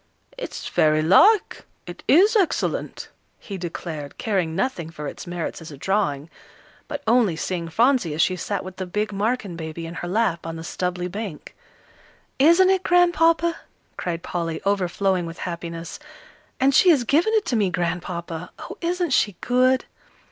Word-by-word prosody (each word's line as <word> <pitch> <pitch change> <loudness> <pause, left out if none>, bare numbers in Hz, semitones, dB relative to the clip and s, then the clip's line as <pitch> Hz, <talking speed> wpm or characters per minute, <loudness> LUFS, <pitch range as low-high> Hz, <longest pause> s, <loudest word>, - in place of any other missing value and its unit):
"It's - - -6
very 155 0 +2
like, 395 - +4 0.2
it - - -9
is 400 - +5
excellent," 385 -7 0 0.3
he 200 - -8
declared, 165 -4 -6
caring 185 -7 -1
nothing 185 -6 -2
for 150 -2 -8
its 140 - -7
merits 175 -1 -4
as 165 - -9
a 145 - -10
drawing, 150 -5 -1 0.6
but - - -5
only 225 -6 +3
seeing 170 +1 -3
Phronsie 230 - +2
as 160 - +1
she 185 - +1
sat 200 +3 -3
with 185 0 -9
the 185 - -4
big 210 +3 -2
Marken 205 -2 -1
baby 165 0 -6
in 165 - -7
her 175 +1 -5
lap 185 -4 0
on 165 - -5
the 165 - -7
stubbly 180 +1 -3
bank. 195 -4 -7 0.8
"Isn't 340 +6 +6
it, 380 -1 +2
Grandpapa?" 340 -2 +3 0.4
cried 170 -1 -4
Polly, 165 -2 -3
overflowing 190 -2 0
with 165 - -8
happiness; 170 -2 -6 0.6
"and 270 +1 +3
she 365 - +6
has 290 -7 +5
given 325 - +2
it 430 - +2
to 245 - -1
me, 205 -4 +2
Grandpapa. 175 -1 -3
Oh, - - -9
isn't 350 -1 -1
she 205 -6 +2
good!" 255 +1 +2
185 Hz, 160 wpm, -23 LUFS, 170-255 Hz, 0.8 s, Isn't